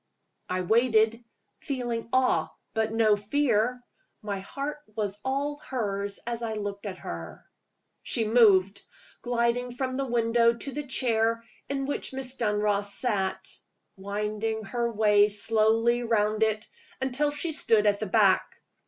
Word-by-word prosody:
I 185 0 -1
waited 225 +2 +2 0.4
feeling 240 -5 -3
awe, 255 0 +2 0.2
but 220 0 0
no 220 -2 +3
fear. 245 +2 0 0.4
My 200 -2 -3
heart 280 +9 -5 0.2
was 205 -2 -3
all 280 +2 -1
hers 200 -7 -3
as 235 0 -3
I 225 -1 -2
looked 205 -1 -5
at 185 -2 -6
her. 85 - -8 0.6
She 225 - +1
moved; 205 -4 +4 0.4
gliding 240 0 0
from 255 0 -2
the 275 -1 -1
window 235 0 +3
to 275 +4 -5
the 290 +1 -5
chair 230 -3 +1 0.3
in 275 -1 -2
which 285 -1 -2
Miss 260 -1 -2
Dunross 210 -3 0
sat; 200 -5 -1 0.5
winding 210 +3 -3
her 235 +3 -2
way 210 -1 +4
slowly 225 +3 +2
round 215 -2 +1
it, 220 0 +1 0.3
until 265 +3 0
she 295 +3 -2
stood 225 -8 +3
at 205 -1 +3
the 215 - -3
back. 195 -1 +3
225 Hz, 135 wpm, -27 LUFS, 210-245 Hz, 0.6 s, moved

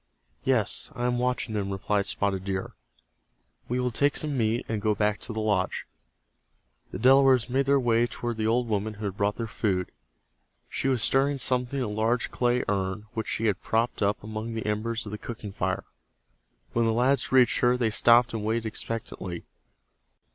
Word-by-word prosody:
"Yes, - - +1
I 120 - -2
am 125 0 +1
watching 125 -2 -1
them," 100 -2 -2
replied 100 +1 -1
Spotted 95 -2 -1
Deer. 95 -1 -3 1.0
"We 125 +1 0
will 125 0 0
take 145 +5 +2
some 150 -2 -1
meat, 115 -1 0
and 110 -2 -2
go 105 0 +1
back 105 0 +1
to - - -6
the 110 - -3
lodge." 105 -4 0 1.0
The - - -6
Delawares 130 -1 +5
made 135 +1 +1
their 140 0 +4
way 120 -1 +2
toward 120 -1 -4
the 110 0 0
old 120 +2 +1
woman 105 0 -1
who 105 +1 -6
had 100 -2 -3
brought 100 +1 0
their 115 - -3
food. 95 -5 -1 0.8
She - - -2
was 130 -4 +1
stirring 140 +1 +2
something 125 0 0
in 130 - 0
a - - -3
large 110 +3 0
clay 125 0 +1
urn 95 +1 -1
which 110 - -3
she 115 - -1
had 105 -4 +1
propped 115 +2 0
up 100 0 +1
among 110 +2 -5
the 110 - -4
embers 110 +2 -1
of 105 - -7
the 105 - -5
cooking 110 -3 -7
fire. 95 -1 -2 0.9
When 115 0 +2
the 115 - +2
lads 130 +4 +2
reached 125 -2 +5
her 125 0 +3
they 115 -3 +1
stopped 120 +2 +5
and 110 -2 -3
waited 115 +1 -1
expectantly. 105 -5 -5
115 Hz, 190 wpm, -27 LUFS, 105-125 Hz, 1.0 s, Delawares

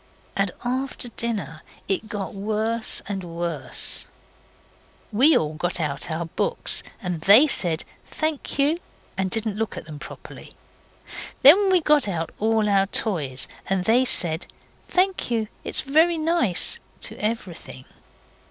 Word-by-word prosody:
And 195 -1 +1 0.2
after 255 0 -2
dinner 200 - -4 0.3
it 200 +3 -2
got 200 -3 -5
worse 220 +3 0
and 195 -2 -4
worse. 170 0 -4 1.0
We 265 +9 +5 0.2
got 175 +2 -1
out 150 0 -3
all 160 - -2
our 170 - -4
books 160 - 0 0.2
and 180 -3 -3
they 210 - +8
said 175 - 0 0.2
'Thank 310 -3 -3
you', 295 +4 +2 0.4
and 190 -1 -1
didn't 220 0 -1
look 225 0 -3
at - - -7
them 155 -2 -9
properly. 150 - -11 0.9
And 380 +8 +8
we 365 -2 +4
got 300 -6 +3
out 165 -4 -3
all 220 0 +1
our 195 -1 +2
toys, 150 - +2 0.2
and 190 -1 0
they 240 +3 +4
said 170 -9 +1 0.4
'Thank 375 -4 0
you, 225 -2 -1 0.2
it's - - -2
very 320 +5 +2
nice' 315 - +2 0.2
to - - -4
everything. 195 - -5
210 Hz, 135 wpm, -23 LUFS, 175-260 Hz, 1.0 s, they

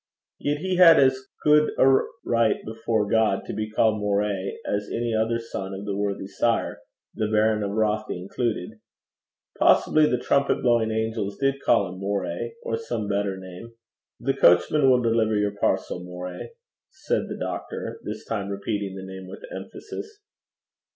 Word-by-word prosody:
Yet 145 +1 0
he 185 0 -1
had 165 -4 +8
as 130 -1 +2 0.2
good 150 0 +4
a - - +5 0.4
right 115 -2 +3
before 110 -1 -1
God 110 -2 +2
to - - -5
be 110 0 -3
called 110 0 +2
Moray 100 -1 -1
as 100 0 -2
any 120 0 -1
other 110 +1 +1
son 95 -4 -6
of 100 +1 -7
that 100 -1 -2
worthy 100 -1 -2
sire, 105 +4 -1 0.3
the 110 - -1
Baron 110 0 +2
of 100 - -1
Rothie 105 -2 -1
included. 110 +1 -3 0.8
Possibly 155 -1 +5
the 125 - +1
trumpet 140 +3 +1
blowing 120 -2 +3
angels 110 -2 -2
did 135 0 0
call 105 -5 +3
him 95 - -10
Moray, 100 +2 -3
or 115 - -1
some 115 -2 -4
better 100 -1 -1
name. 95 +5 -10 0.5
'The - - 0
coachman 110 - +5
will 125 -1 +4
deliver 115 -2 +2
your 105 0 0
parcel, 90 -3 -1
Moray,' 90 - -7 0.4
said 310 +11 -2
the - - -5
doctor, - - -5
this - - -6
time 100 -3 -3
repeating 100 -1 -3
the 95 0 -7
name 95 0 -9
with - - -10
emphasis. 425 -1 -8
110 Hz, 160 wpm, -25 LUFS, 100-120 Hz, 0.8 s, had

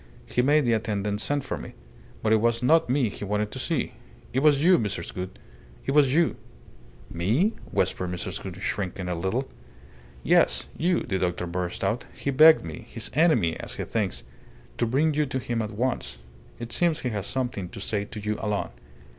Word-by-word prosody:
He 125 - +1
made 145 +2 +4
the 120 - +3
attendant 105 -2 -1
send 145 +2 -1
for - - -3
me. - - -9 0.5
But 110 0 +3
it 110 - +4
was 115 +1 +1
not 160 +2 +4
me 130 -1 +2
he 105 - -7
wanted 105 +1 -1
to - - -5
see - - -1 0.4
it 130 - +2
was 145 0 +4
you, 180 +2 +6
Mrs. 100 -6 -3
Gould! 90 0 -6 0.5
It - - 0
was 140 -2 +5
you." 170 0 +3 0.7
"Me?" 115 - +1 0.2
whispered 90 - 0
Mrs. 90 +1 -4
Gould, 95 -2 -6
shrinking 95 -2 -3
a 90 - -1
little. 95 +10 -1 0.8
"Yes, - - +3
you!" 175 +2 +1
the 95 - -2
doctor 90 -1 -1
burst 90 0 -3
out. - - 0
"He 140 - -2
begged 155 - +7
me 80 -2 -7
his - - -5
enemy, 130 - +3
as - - -6
he - - -3
thinks 95 - -2 0.6
to 120 - +2
bring 150 +6 +2
you 150 0 +1
to 130 - -2
him 120 -2 -2
at 110 - -3
once. 115 - -2 0.4
It 120 0 -7
seems 170 -3 +2
he 125 - -1
has 105 -3 -3
something 120 -8 -2
to - - -9
say 100 0 -1
to 105 - -8
you 105 +1 -2
alone." 105 -2 -1
110 Hz, 195 wpm, -26 LUFS, 95-140 Hz, 0.8 s, begged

